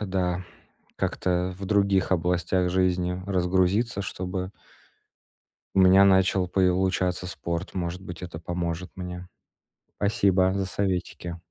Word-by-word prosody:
да, 95 -2 -1 0.5
как-то 90 0 -1
в 100 - -6
других 100 -2 +2
областях 90 +1 +1
жизни 90 0 0
разгрузиться, 95 +4 +1
чтобы 95 -1 -4 1.3
у - - +6
меня 95 +1 +7
начал 95 -1 +4
получаться 90 0 +1
спорт. 85 +3 -4
Может 90 0 -3
быть, 90 -2 -9
это 85 -3 -6
поможет 85 +1 -4
мне. 90 -1 -7 0.7
Спасибо 95 -2 +2
за 100 -1 0
советики. 90 -2 -3
90 Hz, 110 wpm, -26 LUFS, 90-95 Hz, 1.3 s, меня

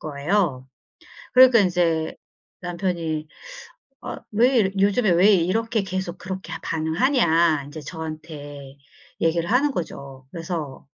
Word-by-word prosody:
거예요. 150 -2 -1 0.7
그러니까 255 -2 +7
인제 175 -4 +1 0.5
남편이 170 -3 -3 0.8
어 - - -5 0.2
왜 245 +4 +4
이러 190 -3 +2
"요즘에 205 +2 +2
왜 185 +5 +5
이렇게 210 +5 +1
계속 185 -2 -4
그렇게 190 0 -7
반응하냐." 165 - +2
인제 150 +2 -9
저한테 150 -3 -8 0.5
얘기를 165 +2 +1
하는 275 +5 +3
거죠. 135 - -7
그래서 165 -6 -6
170 Hz, 255 characters per minute, -23 LUFS, 155-195 Hz, 0.8 s, 그러니까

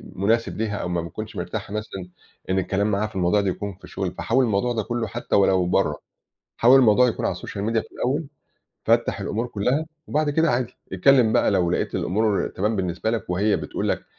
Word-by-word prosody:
مُناسِب 115 +5 0
ليها 105 -1 -2
أو 85 - -3
ما 85 -1 -1
بيتكونش 105 +6 -7
مرتاحة 105 -1 -5
مثلًا 95 -4 -5 0.4
إن 95 - +2
الكلام 100 +3 0
معاها 105 +2 0
في 105 - -15
الموضوع 95 +3 +2
ده 100 - 0
يكون 100 +2 -4
في 95 - -30
الشغل 95 -2 -4
فحاول 130 +3 +1
الموضوع 115 +3 0
ده 110 - -1
كُلُّه 120 +1 -2
حتى - - -3
ولو 95 -2 +4
برّه، 90 - +1 0.6
حاول 125 +3 +6
الموضوع 125 +1 +5
يكون 115 - -2
على - - -1
الsocial - - -8 0.2
media 115 -1 +1
في - - -29
الأول 145 +5 -1 0.6
فَتَّح - - +2
الأمور 115 +3 -2
كُلّها 125 +8 -1 0.2
وبعد 150 0 +1
كده 160 +2 +2
عادي 120 0 -1 0.2
اِتكَلِّم 115 +4 +4
بقى - - +3
لو 90 -4 +2
لقيت - - -1
الأمور 105 +2 0
تمام 105 +3 -1
بالنسبة 90 +3 -1
لَك 115 -4 -3
وهي 100 +4 +2
بتقول - - -3
لَك - - -1
105 Hz, 205 wpm, -23 LUFS, 95-120 Hz, 0.6 s, حاول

